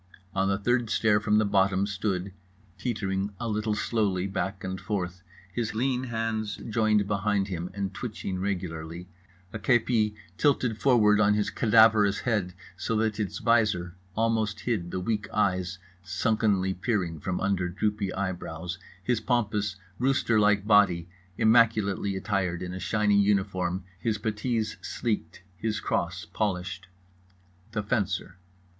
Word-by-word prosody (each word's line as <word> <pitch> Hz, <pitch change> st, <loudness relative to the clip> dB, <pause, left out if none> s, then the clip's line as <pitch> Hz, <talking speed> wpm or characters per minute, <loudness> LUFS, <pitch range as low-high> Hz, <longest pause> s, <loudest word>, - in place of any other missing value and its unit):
On 95 Hz, 0 st, +1 dB
the 100 Hz, -, +1 dB
third 120 Hz, +3 st, +1 dB
stair 105 Hz, -1 st, +3 dB
from 105 Hz, 0 st, +2 dB
the 110 Hz, -, +3 dB
bottom 100 Hz, -1 st, +2 dB
stood 100 Hz, -2 st, -2 dB, 0.5 s
(teetering 100 Hz, -4 st, -2 dB
a 120 Hz, -, -3 dB
little 105 Hz, 0 st, 0 dB
slowly 100 Hz, -5 st, 0 dB
back 95 Hz, 0 st, -3 dB
and 95 Hz, 0 st, -4 dB
forth, 90 Hz, -3 st, -3 dB, 0.3 s
his 115 Hz, -2 st, -2 dB
lean 130 Hz, +2 st, 0 dB
hands 115 Hz, -2 st, -2 dB
joined 110 Hz, -2 st, +2 dB
behind 100 Hz, -1 st, 0 dB
him 90 Hz, -1 st, -3 dB
and 100 Hz, -1 st, -3 dB
twitching 100 Hz, -3 st, -4 dB
regularly, 90 Hz, -3 st, -4 dB, 0.5 s
a 110 Hz, -, -4 dB
kepi 110 Hz, -1 st, +2 dB, 0.2 s
tilted 125 Hz, -6 st, +2 dB
forward 105 Hz, -6 st, +5 dB
on 105 Hz, 0 st, +4 dB
his 105 Hz, -1 st, 0 dB
cadaverous 110 Hz, -2 st, +5 dB
head 100 Hz, -7 st, -1 dB, 0.2 s
so 110 Hz, +4 st, -2 dB
that 110 Hz, -1 st, 0 dB
its 105 Hz, -3 st, -2 dB
visor 105 Hz, -7 st, +2 dB, 0.2 s
almost 110 Hz, -2 st, 0 dB
hid 105 Hz, -8 st, -1 dB
the 95 Hz, -, -3 dB
weak 105 Hz, +3 st, -2 dB
eyes 90 Hz, -3 st, 0 dB, 0.2 s
sunkenly 95 Hz, +1 st, +1 dB
peering 90 Hz, -5 st, -1 dB
from 90 Hz, +4 st, -2 dB
under 95 Hz, -2 st, 0 dB
droopy 100 Hz, +1 st, -1 dB
eyebrows, 90 Hz, -2 st, -4 dB, 0.2 s
his 120 Hz, +1 st, 0 dB
pompous 105 Hz, -5 st, 0 dB, 0.2 s
rooster 125 Hz, -3 st, +2 dB
like 105 Hz, -1 st, +3 dB
body 95 Hz, -6 st, +4 dB, 0.3 s
immaculately 110 Hz, -3 st, +3 dB
attired 90 Hz, -2 st, -1 dB
in 90 Hz, 0 st, -5 dB
a 95 Hz, -, -5 dB
shiny 105 Hz, 0 st, +2 dB
uniform, 95 Hz, -2 st, 0 dB, 0.2 s
his 105 Hz, +4 st, 0 dB
puttees 110 Hz, +1 st, -2 dB
sleeked, 100 Hz, -7 st, -3 dB
his 105 Hz, +1 st, -1 dB
cross -, -, -2 dB
polished)—The 90 Hz, 0 st, -6 dB
Fencer. 100 Hz, -4 st, -1 dB
100 Hz, 135 wpm, -27 LUFS, 95-110 Hz, 0.5 s, forward